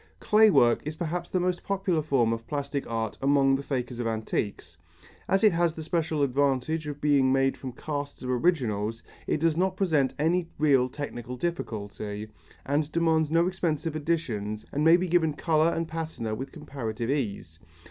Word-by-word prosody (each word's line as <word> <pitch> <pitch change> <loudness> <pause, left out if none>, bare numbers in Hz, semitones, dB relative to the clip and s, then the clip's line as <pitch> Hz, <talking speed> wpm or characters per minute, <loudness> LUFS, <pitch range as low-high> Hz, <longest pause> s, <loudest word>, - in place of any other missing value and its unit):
Clay 215 +1 +5
work 120 - +4
is 155 +1 -5
perhaps 170 +2 -3
the 185 - 0
most 180 0 0
popular 190 -4 0
form 130 -6 +2
of 115 0 -6
plastic 140 -1 -3
art 115 -2 -3
among 135 -1 +4
the 135 - -2
fakers 125 -3 -3
of 120 - -1
antiques. 110 -5 -3 0.5
As 195 +2 +2
it 215 - +7
has 170 -1 +1
the 160 - -6
special 160 -2 0
advantage 140 +3 0
of 145 -1 -5
being 140 -3 +3
made 135 0 +2
from 130 - -7
casts 145 +1 -5
of 125 - -4
originals, 120 - 0 0.2
it - - +1
does 165 0 +2
not 185 +2 0
present 155 -9 +1
any 170 +3 +1
real 135 -4 +3
technical 125 -3 -6
difficulty, 105 -8 -4 0.4
and 145 +3 +1
it 150 - -18
demands 160 -2 +2
no 165 +2 +3
expensive 165 -4 -1
additions 120 -10 -2
and 145 - -1
may 165 +2 +7
be 185 +1 -1
given 165 -3 +2
colour 160 +1 +2
and 165 0 -2
patina 160 -9 -4
with 130 +5 -5
comparative 120 -6 -4
ease. 100 - -3
145 Hz, 180 wpm, -27 LUFS, 125-165 Hz, 0.5 s, it